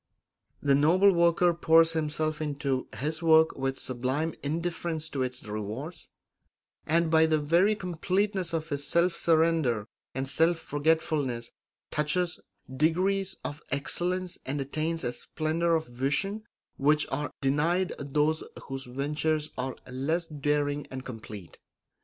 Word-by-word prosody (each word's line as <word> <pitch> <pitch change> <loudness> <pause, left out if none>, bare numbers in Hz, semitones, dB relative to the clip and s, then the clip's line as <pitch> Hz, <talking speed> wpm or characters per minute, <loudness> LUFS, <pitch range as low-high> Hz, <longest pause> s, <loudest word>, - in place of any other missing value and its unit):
The 140 -1 +4
noble 170 +8 +5
worker 170 0 +4
pours 165 0 +5
himself 155 0 -1
into 140 -3 -2
his 155 +3 -2
work 160 -1 +5
with 135 0 -2
sublime 130 +6 -2
indifference 165 +1 -2
to 135 - -3
its 125 0 -3
rewards, 110 - -6 0.8
and 165 +1 +2
by 160 0 +5
the 155 -1 +3
very 170 +8 +3
completeness 185 +1 -1
of 160 -1 -2
his 145 0 -2
self 170 +1 +2
surrender 160 -10 +2 0.3
and 135 +1 -2
self 165 +5 +3
forgetfulness 145 -6 0 0.4
touches 165 +4 0 0.4
degrees 185 +6 +2
of 145 - -5
excellence 180 +6 -2
and 140 +2 -3
attains 155 +4 -2
a 120 - -1
splendour 165 +6 0
of 160 - -1
vision 140 - -2 0.3
which 150 +2 +3
are 145 +2 -1
denied 160 +7 +1
those 150 +2 +1 0.3
whose 135 0 -5
ventures 150 +4 -1
are 130 +1 -3
less 145 +7 -1
daring 145 -2 -1
and 130 0 -7
complete. 110 -6 -9
155 Hz, 130 wpm, -28 LUFS, 140-170 Hz, 0.8 s, noble